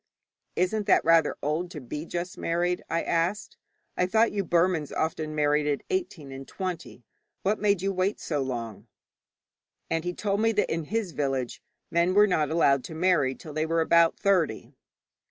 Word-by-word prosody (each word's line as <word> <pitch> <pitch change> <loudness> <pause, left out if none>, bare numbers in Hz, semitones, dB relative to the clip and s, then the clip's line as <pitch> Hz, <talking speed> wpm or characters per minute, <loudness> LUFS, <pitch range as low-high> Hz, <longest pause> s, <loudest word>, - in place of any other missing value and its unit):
'Isn't 200 +4 0
that - - +4
rather 165 0 +4
old 155 +5 -1
to 165 - -7
be 150 +5 -6
just 175 +1 -4
married?' 175 +1 -1
I 165 - 0
asked. 170 +5 -1 0.4
'I 180 - +1
thought 225 +4 +3
you 200 -1 -1
Burmans 170 -3 +1
often 155 -1 -2
married 150 0 +2
at 145 -1 -1
eighteen 185 - -3
and 135 0 -8
twenty. 180 -9 -6 0.4
What 205 +3 +1
made 200 -3 +1
you 195 0 0
wait 185 +2 0
so 150 -3 -2
long?' 115 -5 -5 1.0
And 165 -1 0
he 175 0 -3
told 205 0 -1
me 225 0 +3
that 210 -5 +1
in 165 -1 -3
his 215 0 -2
village 135 -5 -2 0.3
men 170 +2 +2
were 205 +1 +7
not 155 -7 +1
allowed 140 -5 +3
to 160 - -8
marry 160 -6 +2
till 155 - -10
they 155 +1 -1
were 165 0 +1
about 170 +1 +4
thirty. 180 - 0
165 Hz, 175 wpm, -27 LUFS, 150-185 Hz, 1.0 s, were